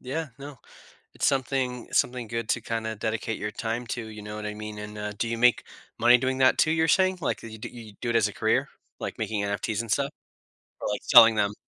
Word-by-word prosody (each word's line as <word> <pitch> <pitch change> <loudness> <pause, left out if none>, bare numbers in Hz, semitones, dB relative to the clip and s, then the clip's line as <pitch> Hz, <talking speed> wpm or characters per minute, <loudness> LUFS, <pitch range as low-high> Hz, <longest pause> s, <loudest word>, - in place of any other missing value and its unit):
Yeah. 150 +5 -4
No. 140 -1 -9 0.6
It's - - -1
something 130 -2 -1
something 125 -2 +1
good 115 -1 -4
to, 120 - +1
kinda, 110 0 -3
dedicate 110 +1 -3
your 105 - -4
time 115 +3 -3
to, 120 -1 -4
you 110 -1 -9
know 105 +1 -7
what 105 0 -6
I 105 - -4
mean, 105 0 -7
and, 105 0 -8
uh, 105 0 -4
do 115 - -1
you 115 0 -2
make 125 0 +4 0.4
money 120 +1 +7
doing 130 +1 -1
that 130 0 +5
too, 155 - +3
you're 160 0 +2
saying, 185 +2 +3
like, - - -2
uh, - - -7
you 110 0 -9
do - - -6
you 115 -3 -11
do 120 - -2
it 120 - 0
as 110 -3 +4
a 105 - -7
career, - - +1 0.3
like - - -5
making 105 -2 -1
NFTs 100 +2 -2
and 115 -2 -6
stuff, - - +1 0.7
or, - - -2
like, 105 - -2
selling 115 -2 +8
them? 105 -1 +1
115 Hz, 240 wpm, -26 LUFS, 105-125 Hz, 0.7 s, selling